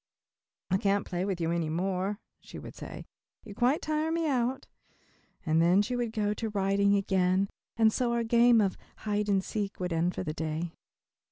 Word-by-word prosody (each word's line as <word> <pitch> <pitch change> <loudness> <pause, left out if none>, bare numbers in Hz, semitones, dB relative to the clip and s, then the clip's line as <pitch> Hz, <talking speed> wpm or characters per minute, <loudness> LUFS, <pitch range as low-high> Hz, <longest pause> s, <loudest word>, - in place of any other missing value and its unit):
"I 190 - +4
can't 200 0 +1
play 180 0 -2
with 195 -3 -2
you 165 -1 0
any 170 -2 -1
more," 190 +4 -1 0.2
she - - -11
would - - -9
say, - - -9 0.4
"you 210 - -9
quite 250 +7 +1
tire 310 +1 0
me 330 -1 0
out," 260 -1 0 0.8
and 160 0 +3
then 180 +4 +4
she 245 +4 -2
would 240 -2 -1
go 210 -2 0
to 220 +1 -3
writing 200 0 +2
again 190 0 +2 0.3
and 220 -1 +4
so 245 -2 0
our 235 0 +1
game 235 0 +5
of 195 -2 0 0.3
"hide 210 0 0
and 195 -1 +2
seek" 205 -1 -4
would 180 -2 -2
end 170 +2 0
for - - -3
that 155 -3 -4
day. 160 +1 -3
200 Hz, 190 wpm, -29 LUFS, 180-230 Hz, 0.8 s, game